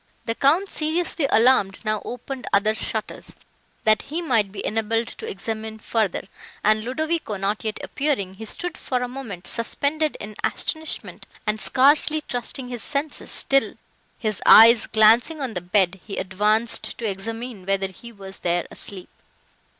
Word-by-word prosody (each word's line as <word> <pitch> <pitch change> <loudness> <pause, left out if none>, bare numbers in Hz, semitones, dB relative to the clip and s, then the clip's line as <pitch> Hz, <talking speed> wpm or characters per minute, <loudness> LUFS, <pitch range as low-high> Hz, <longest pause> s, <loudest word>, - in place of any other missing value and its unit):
The 230 - 0
Count, 320 +11 +2
seriously 315 -1 0
alarmed, 220 -4 +4
now 215 -1 0
opened 255 +1 -7
other 205 +2 +3
shutters, 220 0 -4 0.5
that 215 0 +4
he 315 +4 -5
might 230 - +1
be 205 - -6
enabled 225 +1 -1
to - - -8
examine 220 +2 -5
further, 220 -3 -1 0.4
and, 215 +1 +3
Ludovico 310 -2 -2
not 200 +2 -2
yet 215 -1 -3
appearing, 265 -11 -1
he 220 +3 -9
stood 355 +10 -4
for 250 -1 -2
a - - -2
moment, 235 -9 -8
suspended 285 +6 -1
in 210 +1 -7
astonishment 315 -1 -3 0.2
and 215 0 -1
scarcely 295 +3 +4
trusting 250 -1 -5
his 245 -2 -4
senses, 290 +1 0
till, 275 0 +2 0.4
his 215 -3 -2
eyes 230 0 +8
glancing 225 +8 +4
on 260 -5 -3
the 180 - -3
bed, 185 +1 +1
he 200 - -7
advanced 210 +5 +1
to 235 - -5
examine 220 +1 -5
whether 195 -1 0
he 235 +5 -12
was 195 -3 -10
there 175 0 0
asleep. 190 -3 -6
225 Hz, 150 wpm, -23 LUFS, 205-270 Hz, 0.5 s, eyes